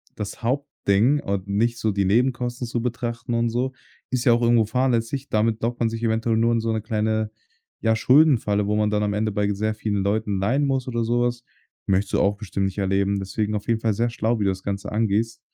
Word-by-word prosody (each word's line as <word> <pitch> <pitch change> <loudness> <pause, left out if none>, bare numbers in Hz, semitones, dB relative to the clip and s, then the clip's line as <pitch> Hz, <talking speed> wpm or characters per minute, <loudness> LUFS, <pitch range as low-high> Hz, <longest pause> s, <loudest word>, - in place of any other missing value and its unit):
das 105 +2 -6
Hauptding 130 -1 +1
und 100 -5 -3
nicht 115 +4 0
so 110 -2 0
die 100 -1 0
Nebenkosten 120 +3 +1
zu 120 0 -2
betrachten 120 0 -3
und 115 0 +1
so, 125 +3 -1 0.4
ist 125 -2 -1
ja 120 - +6
auch 120 - +1
irgendwo 115 -1 +4
fahrlässig. 125 +3 0
Damit 110 +1 +1
lockt 120 +1 -2
man 115 - +2
sich 115 0 -5
eventuell 115 0 +1
nur 115 +1 +3
in 115 - +2
so 115 0 -1
'ne 110 - -1
kleine, 110 0 -1 0.5
ja, 110 0 +2
Schuldenfalle, 115 -5 +4
wo 105 +1 0
man 105 0 +2
dann 105 0 0
am 105 0 0
Ende 110 +1 0
bei 105 0 0
sehr 110 +2 -1
vielen 105 -2 -1
Leuten 100 0 0
leihen 125 +9 +1
muss 135 -2 -1
oder 115 -2 -1
sowas. 120 +1 0 0.4
Möchtest 100 +1 0
du - - +3
auch 100 +1 +2
bestimmt 100 -2 -3
nicht 95 +1 -3
erleben. 100 +1 +1
Deswegen, 105 +2 -2
auf 105 -1 -4
jeden 115 -1 +1
Fall 110 -2 +1
sehr 115 +3 0
schlau, 115 0 -1
wie 105 - 0
du 95 - +3
das 95 0 -4
Ganze 100 0 -4
angehst. 110 +1 0
110 Hz, 225 wpm, -23 LUFS, 105-120 Hz, 0.5 s, ja